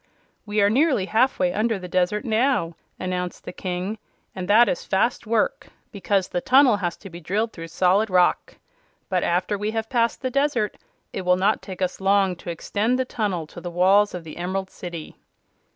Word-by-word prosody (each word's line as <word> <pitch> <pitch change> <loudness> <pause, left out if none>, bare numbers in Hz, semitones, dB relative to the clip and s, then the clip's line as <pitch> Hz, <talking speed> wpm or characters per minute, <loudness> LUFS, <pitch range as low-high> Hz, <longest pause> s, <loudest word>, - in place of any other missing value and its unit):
"We 205 0 +1
are 200 - +5
nearly 265 - +2
halfway 220 -5 +2
under 220 +1 0
the 180 -1 -8
desert 185 +3 0
now," 225 -7 +1 0.2
announced 180 -1 -4
the - - -7
King; 185 +4 -4 0.3
"and 185 -2 -5
that 225 +4 +6
is - - -1
fast 220 +4 0
work, 225 -1 0 0.2
because 195 -2 0
the 175 - -2
tunnel 255 -2 +5
has 175 -4 -3
to 195 - -11
be 170 - -9
drilled 210 +7 -2
through 165 -1 -8
solid 185 +5 +2
rock. 180 -1 +2 0.5
But 185 -3 +1
after 185 +4 0
we 210 +1 -1
have 225 +2 -3
passed 235 0 +1
the 255 - -1
desert 275 -6 0 0.4
it - - -3
will 180 0 +3
not 200 +4 +1
take 190 -1 -5
us 185 +1 -3
long 195 -1 +3
to 175 - -9
extend 210 +8 -1
the 260 - 0
tunnel 200 -9 -2
to 175 - -11
the 175 - -5
walls 190 +4 +3
of 175 - -6
the 155 -1 -10
Emerald 185 +2 -3
City." 170 -3 -8
195 Hz, 190 wpm, -23 LUFS, 180-220 Hz, 0.5 s, that